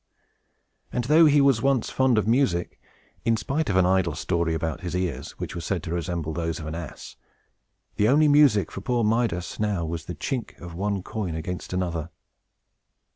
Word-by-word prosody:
And 125 Hz, -, -1 dB
though 155 Hz, +6 st, +6 dB
he 145 Hz, 0 st, +5 dB
once 135 Hz, -5 st, +4 dB
was 135 Hz, -3 st, +1 dB
fond 130 Hz, -3 st, +2 dB
of 110 Hz, -, +1 dB
music 110 Hz, -8 st, +1 dB, 0.4 s
(in 115 Hz, -1 st, +2 dB
spite 140 Hz, +7 st, -2 dB
of 95 Hz, -, 0 dB
an 95 Hz, -1 st, +5 dB
idle 90 Hz, -4 st, +2 dB
story 85 Hz, -1 st, 0 dB
about 80 Hz, -1 st, -3 dB
his 90 Hz, -1 st, -4 dB
ears, 90 Hz, -1 st, -3 dB
which -, -, -5 dB
were 85 Hz, -, -5 dB
said 90 Hz, -1 st, -2 dB
to 85 Hz, -, -4 dB
resemble 85 Hz, -2 st, -3 dB
those 80 Hz, 0 st, -2 dB
of 80 Hz, -, -7 dB
an 80 Hz, -, -5 dB
ass), 85 Hz, -1 st, -8 dB, 0.8 s
the 105 Hz, -, +3 dB
only 150 Hz, +3 st, +5 dB
music 145 Hz, -8 st, +4 dB
for 95 Hz, -, -6 dB
poor 120 Hz, +3 st, 0 dB
Midas, 110 Hz, -5 st, 0 dB
now, 105 Hz, -5 st, 0 dB
was 80 Hz, 0 st, -5 dB
the 90 Hz, -, -6 dB
chink 130 Hz, -4 st, -4 dB
of 90 Hz, -2 st, -9 dB
one 100 Hz, +1 st, -2 dB
coin 95 Hz, -7 st, -4 dB
against 90 Hz, +3 st, -5 dB
another. 85 Hz, -3 st, -2 dB
95 Hz, 185 wpm, -25 LUFS, 85-120 Hz, 0.8 s, though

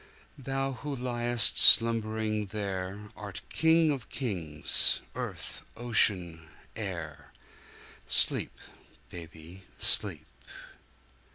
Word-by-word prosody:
Thou 135 Hz, +1 st, -4 dB
who 140 Hz, +2 st, -7 dB
liest 120 Hz, -2 st, 0 dB
slumbering 110 Hz, -2 st, +3 dB
there, 100 Hz, 0 st, -6 dB
Art 105 Hz, -3 st, -9 dB
King 160 Hz, -1 st, +2 dB
of 135 Hz, -5 st, -6 dB
Kings, 85 Hz, -, +3 dB
earth, -, -, -8 dB, 0.2 s
ocean, 90 Hz, -9 st, 0 dB, 0.3 s
air. 85 Hz, -9 st, -8 dB, 0.8 s
Sleep, -, -, 0 dB, 0.5 s
baby, 85 Hz, +2 st, -13 dB, 0.2 s
sleep! 80 Hz, -7 st, +3 dB
105 Hz, 80 wpm, -27 LUFS, 90-120 Hz, 0.8 s, slumbering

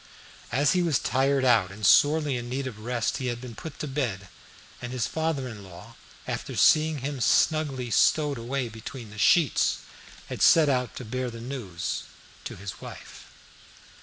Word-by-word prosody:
As 140 Hz, +3 st, +3 dB
he 180 Hz, -, +2 dB
was 165 Hz, -6 st, +2 dB
tired 135 Hz, +3 st, +1 dB
out 115 Hz, -7 st, +4 dB
and 100 Hz, +2 st, -6 dB
sorely 145 Hz, +3 st, +4 dB
in 120 Hz, 0 st, -5 dB
need 135 Hz, +2 st, -3 dB
of 120 Hz, -5 st, -6 dB
rest, 120 Hz, +1 st, -2 dB
he 130 Hz, -, -3 dB
had 120 Hz, -1 st, -3 dB
been 125 Hz, -1 st, -9 dB
put 155 Hz, +7 st, -9 dB
to 150 Hz, -, -4 dB
bed, 120 Hz, -9 st, -3 dB, 0.5 s
and 120 Hz, -, -6 dB
his 125 Hz, -2 st, -1 dB
father 160 Hz, -5 st, -2 dB
in 110 Hz, -4 st, -9 dB
law, 95 Hz, +5 st, -12 dB, 0.3 s
after -, -, -5 dB
seeing 155 Hz, 0 st, +4 dB
him 140 Hz, -2 st, -4 dB
snugly 135 Hz, +2 st, +2 dB
stowed 145 Hz, +2 st, +3 dB
away 125 Hz, +2 st, -2 dB
between 115 Hz, +1 st, -9 dB
the 105 Hz, -, -10 dB
sheets, 155 Hz, +6 st, +3 dB, 0.5 s
had -, -, -7 dB
set 160 Hz, -3 st, +6 dB
out 125 Hz, -2 st, 0 dB
to 130 Hz, -, -7 dB
bear 125 Hz, +3 st, -3 dB
the 115 Hz, -1 st, -9 dB
news 115 Hz, -9 st, -5 dB, 0.4 s
to -, -, -6 dB
his 100 Hz, +1 st, -8 dB
wife. -, -, -11 dB
125 Hz, 175 wpm, -26 LUFS, 115-140 Hz, 0.5 s, set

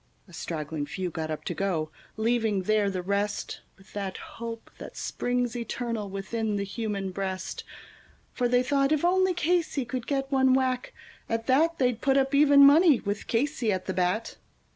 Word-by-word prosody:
A 180 Hz, -, -17 dB
straggling 155 Hz, -2 st, -4 dB
few 185 Hz, +1 st, -4 dB
got 160 Hz, -1 st, -4 dB
up 155 Hz, -, -4 dB
to -, -, -2 dB
go, 165 Hz, -6 st, -1 dB, 0.3 s
leaving 220 Hz, -3 st, +1 dB
there 210 Hz, 0 st, +2 dB
the 185 Hz, -2 st, -3 dB
rest 200 Hz, +2 st, -2 dB, 0.2 s
With 195 Hz, +1 st, -20 dB
that 195 Hz, -2 st, -4 dB
hope 230 Hz, 0 st, -8 dB
that -, -, -9 dB
springs 245 Hz, -1 st, -1 dB
eternal 230 Hz, -3 st, -3 dB
within 210 Hz, +3 st, -2 dB
the 200 Hz, -, -1 dB
human 200 Hz, -2 st, -3 dB
breast; 190 Hz, 0 st, -4 dB, 0.7 s
For 245 Hz, -, +1 dB
they 245 Hz, +1 st, +3 dB
thought 275 Hz, +1 st, +1 dB
if 310 Hz, +1 st, +2 dB
only 375 Hz, 0 st, +3 dB
Casey 335 Hz, -5 st, 0 dB
could 245 Hz, 0 st, -5 dB
get 270 Hz, -1 st, -1 dB
one 265 Hz, -1 st, +4 dB
whack, 255 Hz, -1 st, 0 dB, 0.4 s
at 225 Hz, 0 st, -1 dB
that 320 Hz, +7 st, +3 dB
They'd 250 Hz, -3 st, +1 dB
put 270 Hz, 0 st, +3 dB
up 270 Hz, +1 st, +1 dB
even 280 Hz, 0 st, +7 dB
money, 300 Hz, -1 st, +6 dB
with 205 Hz, 0 st, -4 dB
Casey 240 Hz, -2 st, 0 dB
at 185 Hz, -1 st, -2 dB
the 190 Hz, -, -2 dB
bat. 185 Hz, +5 st, -1 dB
230 Hz, 175 wpm, -27 LUFS, 195-270 Hz, 0.7 s, even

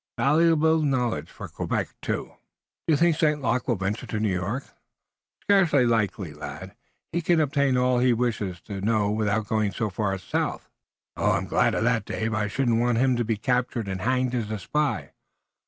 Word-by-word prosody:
Valuable 160 Hz, +2 st, +3 dB
knowledge 130 Hz, -5 st, 0 dB
for -, -, -9 dB
Quebec, -, -, -2 dB
too." -, -, -3 dB, 0.6 s
"Do 160 Hz, -, +4 dB
you -, -, +4 dB
think 170 Hz, 0 st, +3 dB
St. 150 Hz, -2 st, +2 dB
Luc 125 Hz, -2 st, -1 dB
will 120 Hz, -, +2 dB
venture 100 Hz, +3 st, -3 dB
to 105 Hz, -, -3 dB
New 105 Hz, -3 st, +1 dB
York?" 105 Hz, +10 st, -2 dB, 0.8 s
"Scarce 195 Hz, -5 st, +3 dB
likely, 110 Hz, -, +1 dB
lad. 75 Hz, +6 st, -8 dB, 0.4 s
He 170 Hz, -, -1 dB
can 170 Hz, 0 st, +2 dB
obtain 140 Hz, -3 st, +2 dB
about 125 Hz, -, +2 dB
all 125 Hz, -1 st, +2 dB
he 125 Hz, 0 st, +4 dB
wishes 110 Hz, -7 st, -1 dB
to 100 Hz, -3 st, -7 dB
know 105 Hz, -1 st, +1 dB
without 105 Hz, 0 st, 0 dB
going 105 Hz, -1 st, 0 dB
so 110 Hz, -1 st, -2 dB
far 100 Hz, 0 st, -1 dB
south." 90 Hz, -, -3 dB, 0.5 s
"I'm -, -, +1 dB
glad -, -, +2 dB
of -, -, 0 dB
that, -, -, +1 dB
Dave. 110 Hz, 0 st, -2 dB
I 110 Hz, -1 st, 0 dB
shouldn't 115 Hz, +1 st, +1 dB
want 120 Hz, -1 st, +2 dB
him 130 Hz, +1 st, +3 dB
to 120 Hz, -, 0 dB
be 115 Hz, -1 st, -1 dB
captured 125 Hz, -1 st, -1 dB
and 95 Hz, -1 st, -4 dB
hanged 130 Hz, +2 st, +1 dB
as 115 Hz, -4 st, -2 dB
a 110 Hz, -, -2 dB
spy." 145 Hz, +4 st, -1 dB
120 Hz, 190 wpm, -25 LUFS, 105-135 Hz, 0.8 s, Do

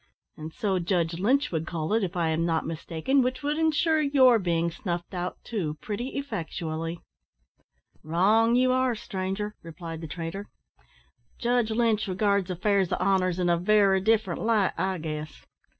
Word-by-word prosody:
"And 155 Hz, +1 st, -8 dB
so 195 Hz, -2 st, -1 dB
Judge 170 Hz, -1 st, 0 dB
Lynch 265 Hz, +9 st, +2 dB
would 160 Hz, -1 st, -2 dB
call 160 Hz, +3 st, -2 dB
it, 225 Hz, -1 st, +2 dB
if 180 Hz, -1 st, -3 dB
I 165 Hz, -2 st, +1 dB
am 160 Hz, +1 st, 0 dB
not 165 Hz, -1 st, 0 dB
mistaken, 165 Hz, -, 0 dB
which 255 Hz, +2 st, -2 dB
would 295 Hz, +2 st, -1 dB
insure 320 Hz, 0 st, +2 dB
your 265 Hz, -5 st, +5 dB
being 170 Hz, -2 st, 0 dB
snuffed 175 Hz, +1 st, -5 dB
out 180 Hz, 0 st, -3 dB
too, 165 Hz, -10 st, -3 dB
pretty 240 Hz, +6 st, -4 dB
effectually." 165 Hz, -, -4 dB, 1.0 s
"Wrong, 210 Hz, +9 st, +3 dB
you 255 Hz, +1 st, +3 dB
air, 255 Hz, -2 st, +1 dB
stranger," 205 Hz, -1 st, -4 dB
replied 165 Hz, 0 st, -8 dB
the 160 Hz, -, -6 dB
trader; 170 Hz, +6 st, -6 dB, 0.9 s
"Judge 240 Hz, -1 st, +1 dB
Lynch 220 Hz, -1 st, +1 dB
regards 200 Hz, 0 st, +1 dB
affairs 190 Hz, +1 st, +1 dB
of -, -, 0 dB
honour 185 Hz, -1 st, +2 dB
in 180 Hz, 0 st, -1 dB
a 170 Hz, 0 st, +3 dB
very 195 Hz, +1 st, +3 dB
different 220 Hz, +2 st, +1 dB
light, 220 Hz, -4 st, +2 dB
I 190 Hz, 0 st, -1 dB
guess. 155 Hz, -1 st, -6 dB
190 Hz, 160 wpm, -27 LUFS, 170-225 Hz, 1.0 s, your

